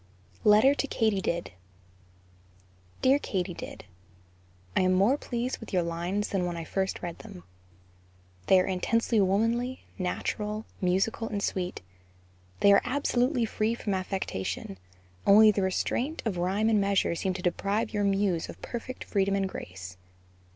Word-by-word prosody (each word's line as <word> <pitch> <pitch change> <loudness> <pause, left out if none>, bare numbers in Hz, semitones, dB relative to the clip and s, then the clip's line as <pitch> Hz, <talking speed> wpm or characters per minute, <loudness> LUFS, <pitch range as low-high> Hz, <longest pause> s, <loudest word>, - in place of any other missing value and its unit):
LETTER 215 +6 +6
TO 280 - -2
KATYDID. 195 -8 0 1.5
DEAR 270 +2 +5
KATYDID: 185 -8 -4 0.9
I - - +4
am 185 0 +3
more 200 +8 +4
pleased 250 -2 -3
with 225 - -10
your 180 -2 +2
lines 175 +5 -2
than 185 -3 0
when 175 -1 -4
I 165 - -4
first 190 +4 -2
read 170 -1 -5
them; 90 - -11 1.0
they 190 - +6
are 185 - +2
intensely 220 +5 +1
womanly, 230 +6 +1 0.2
natural, 210 +3 -2 0.2
musical 195 +5 0
and 200 -2 -3
sweet 180 -1 -2 0.8
they 200 - +7
are 200 - +6
absolutely 250 -1 +1
free 220 +1 -1
from 210 -3 -3
affectation, 185 - -3 0.5
only 215 +2 +8
the 205 - -1
restraint 240 - -1
of 205 -5 -1
rhyme 195 +5 +1
and 215 -2 +3
measure 200 -3 +2
seem 185 +2 -2
to 180 - -6
deprive 200 +6 -1
your 205 -1 0
muse 195 -4 +1
of - - -9
perfect 250 +2 -6
freedom 195 -1 +1
and 195 -1 0
grace. 90 - -8
200 Hz, 145 wpm, -28 LUFS, 185-225 Hz, 1.5 s, only